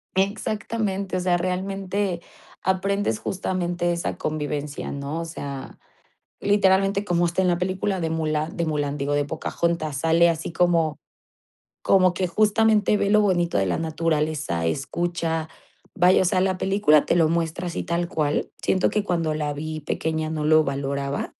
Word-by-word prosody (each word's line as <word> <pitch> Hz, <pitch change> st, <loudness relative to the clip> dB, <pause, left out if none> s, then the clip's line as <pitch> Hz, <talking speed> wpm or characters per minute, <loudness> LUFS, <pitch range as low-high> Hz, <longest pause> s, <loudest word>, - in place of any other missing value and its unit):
exactamente. 200 Hz, 0 st, -1 dB
O -, -, 0 dB
sea, 180 Hz, -1 st, +2 dB
realmente 190 Hz, 0 st, -2 dB, 0.4 s
aprendes 190 Hz, -, 0 dB
justamente 175 Hz, -2 st, -1 dB
esa 170 Hz, 0 st, -2 dB
convivencia, 150 Hz, -1 st, -3 dB
¿no? 140 Hz, +3 st, -4 dB
O -, -, -4 dB
sea, 140 Hz, -5 st, -7 dB, 0.6 s
literalmente 195 Hz, 0 st, +3 dB
como 175 Hz, -1 st, +2 dB
está 175 Hz, +2 st, 0 dB
en 185 Hz, -, +2 dB
la 175 Hz, -1 st, +2 dB
película 185 Hz, +1 st, -1 dB
de 165 Hz, -, -1 dB
Mulan 155 Hz, 0 st, -1 dB
de 170 Hz, -, 0 dB
Mulan, 145 Hz, -2 st, -1 dB
digo, 145 Hz, 0 st, -1 dB
de 145 Hz, 0 st, +1 dB
Pocahontas, 160 Hz, 0 st, -2 dB
sale 165 Hz, +3 st, +4 dB
así 165 Hz, 0 st, -3 dB
como 165 Hz, -3 st, +2 dB, 0.9 s
como 185 Hz, -2 st, +4 dB
que 185 Hz, +2 st, 0 dB
justamente 215 Hz, +2 st, +3 dB
ve 200 Hz, 0 st, 0 dB
lo 210 Hz, -, +5 dB
bonito 175 Hz, -, +1 dB
de 95 Hz, -, +1 dB
la 90 Hz, -, 0 dB
naturaleza, 155 Hz, -, -1 dB
escucha, 165 Hz, -, -2 dB, 0.5 s
vaya, 180 Hz, -1 st, +5 dB
o -, -, +1 dB
sea, 185 Hz, +1 st, +2 dB
la 185 Hz, 0 st, +1 dB
película 195 Hz, -7 st, +3 dB
te -, -, +2 dB
lo 165 Hz, -2 st, +4 dB
muestra 170 Hz, +2 st, -1 dB
así -, -, -4 dB
tal 170 Hz, +1 st, -1 dB
cual. 150 Hz, -4 st, -1 dB
Siento 185 Hz, -, +2 dB
que 210 Hz, -1 st, 0 dB
cuando 165 Hz, -4 st, 0 dB
la 150 Hz, -1 st, -2 dB
vi 155 Hz, +2 st, -5 dB
pequeña 160 Hz, +1 st, -2 dB
no 155 Hz, -1 st, -2 dB
lo 155 Hz, +1 st, +5 dB
valoraba. 140 Hz, 0 st, -3 dB
170 Hz, 160 wpm, -24 LUFS, 155-190 Hz, 0.9 s, lo